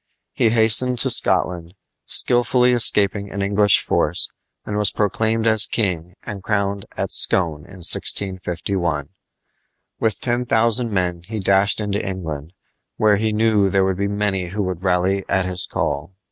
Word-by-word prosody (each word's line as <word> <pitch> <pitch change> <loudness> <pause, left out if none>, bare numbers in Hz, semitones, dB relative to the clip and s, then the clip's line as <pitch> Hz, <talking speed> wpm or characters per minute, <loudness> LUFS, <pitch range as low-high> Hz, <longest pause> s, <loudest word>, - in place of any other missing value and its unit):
He 115 - +1
hastened 115 +3 +2
to - - +1
Scotland, 85 0 +1 0.3
skilfully 125 +1 +3
escaping 100 -4 +2
an 100 0 -4
English 100 0 +4
force, 80 +4 -1 0.4
and 105 - -5
was 105 0 +3
proclaimed 110 +2 -1
as 110 -2 +4
king 90 -5 -3
and 100 -2 -7
crowned 100 -1 -2
at - - -3
Scone, 80 -5 +1
in 95 -3 -12
1651. 90 -5 0 0.9
With 110 -1 -1
ten 120 0 -1
thousand 115 +1 +2
men 90 -3 -2
he 110 0 -5
dashed 100 +1 +2
into 105 0 -2
England, 85 -5 -6 0.4
where 105 -2 +3
he 110 +1 -1
knew 105 -2 +2
there 95 0 +1
were 95 - 0
many 100 -1 -2
who 100 +4 -3
would 90 -2 -4
rally 95 +1 0
at 95 -1 +1
his 90 0 -2
call. 75 +6 -4
100 Hz, 145 wpm, -20 LUFS, 90-110 Hz, 0.9 s, English